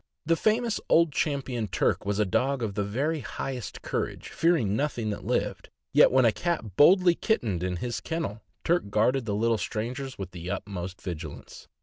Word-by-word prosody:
The 165 +2 +3
famous 220 +4 +1
Old 170 -1 +5
Champion 135 -6 -1
Turk 95 +1 0
was 100 0 0
a 105 - +3
dog 130 +7 0
of 105 -3 -2
the 100 +1 -1
very 140 +10 -1
highest 130 -3 -5
courage, - - -3
fearing 160 - +2
nothing 120 -5 -1
that 105 - -5
lived, - - -1 0.2
yet - - +7
when 130 -1 +5
a 115 - +5
cat 115 - -3
boldly 180 - +6
kittened 115 - 0
in 90 0 -1
his 120 +6 -3
kennel, 115 -11 -3 0.2
Turk 170 -10 +1
guarded 115 +5 +2
the 105 -2 -1
little 115 +1 +1
strangers 125 +7 -4
with 95 -2 -6
the 90 0 -7
utmost 95 -1 -5
vigilance. 80 -4 -8
115 Hz, 180 wpm, -27 LUFS, 100-150 Hz, 0.2 s, yet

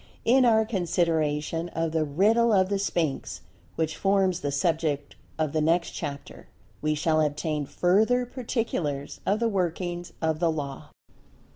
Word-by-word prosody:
In 255 +2 +5
our 220 -2 +4
consideration 165 -4 0
of 165 -1 0
"The 160 -1 +1
Riddle 210 +11 +3
of 190 -2 +3
the 200 -1 0
Sphinx," 165 -7 -2 0.3
which 160 -1 -1
forms 195 -2 +2
the 145 - -2
subject 150 -1 -1 0.2
of 155 -2 -1
the 155 - +1
next 170 +3 +2
chapter, 145 -3 -7 0.3
we 155 0 +1
shall 155 +1 +2
obtain 150 -1 -1
further 220 +8 +2
particulars 225 - -3
of 205 +2 +2
the 235 - +2
workings 175 -3 -2
of 160 -1 0
the 170 -1 +2
Law. 140 -3 -5
165 Hz, 145 wpm, -26 LUFS, 155-195 Hz, 0.3 s, In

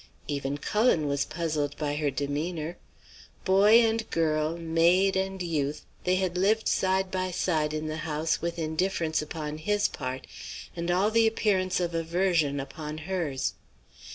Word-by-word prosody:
"Even 140 -1 -2
Cullen 210 - +2
was 140 0 0
puzzled 155 -3 -2
by 150 -2 -1
her 150 -1 +1
demeanour. 150 +4 -3 0.7
Boy 205 +4 +6
and 225 -1 0
girl, 155 0 +1
maid 170 +4 +3
and 190 0 -1
youth, 150 -3 -2 0.2
they 180 0 +3
had 185 -1 0
lived 215 +4 +2
side 190 0 +1
by 185 0 -1
side 160 -4 0
in 155 0 -3
the 155 0 -3
house 155 0 -1
with 170 +1 -2
indifference 160 0 0
upon 150 0 -5
his 205 +5 +1
part 130 -1 -5 0.5
and 170 0 -3
all 190 +4 +3
the 225 0 +4
appearance 190 -5 +1
of 175 -1 -1
aversion 165 -3 +1
upon 150 +3 -6
hers. 160 -5 -2
165 Hz, 150 wpm, -28 LUFS, 150-190 Hz, 0.7 s, Boy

